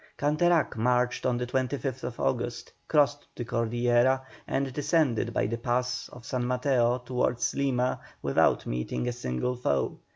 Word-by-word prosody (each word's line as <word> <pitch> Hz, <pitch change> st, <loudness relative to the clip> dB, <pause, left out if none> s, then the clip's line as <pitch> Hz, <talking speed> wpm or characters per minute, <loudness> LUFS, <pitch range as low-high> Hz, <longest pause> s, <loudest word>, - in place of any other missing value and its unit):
Canterac 155 Hz, +3 st, +2 dB
marched 125 Hz, +2 st, +1 dB
on 125 Hz, -1 st, +1 dB
the 125 Hz, -, -2 dB
25th 130 Hz, -1 st, -2 dB
August, 120 Hz, -1 st, -2 dB, 0.2 s
crossed 145 Hz, -1 st, +2 dB
the 120 Hz, -, -4 dB
Cordillera, 120 Hz, +3 st, +2 dB, 0.2 s
and 135 Hz, -1 st, -1 dB
descended 140 Hz, -6 st, +1 dB
by 100 Hz, -, 0 dB
the 115 Hz, +3 st, -2 dB
pass 125 Hz, +1 st, -1 dB
of 120 Hz, -2 st, -13 dB
San 125 Hz, -1 st, -2 dB
Mateo 125 Hz, -1 st, +2 dB
towards 125 Hz, -1 st, -1 dB
Lima 130 Hz, -2 st, 0 dB, 0.2 s
without -, -, +3 dB
meeting 60 Hz, -, -2 dB
a -, -, +1 dB
single 120 Hz, -, -2 dB
foe. 70 Hz, -, -1 dB
125 Hz, 140 wpm, -28 LUFS, 120-130 Hz, 0.2 s, without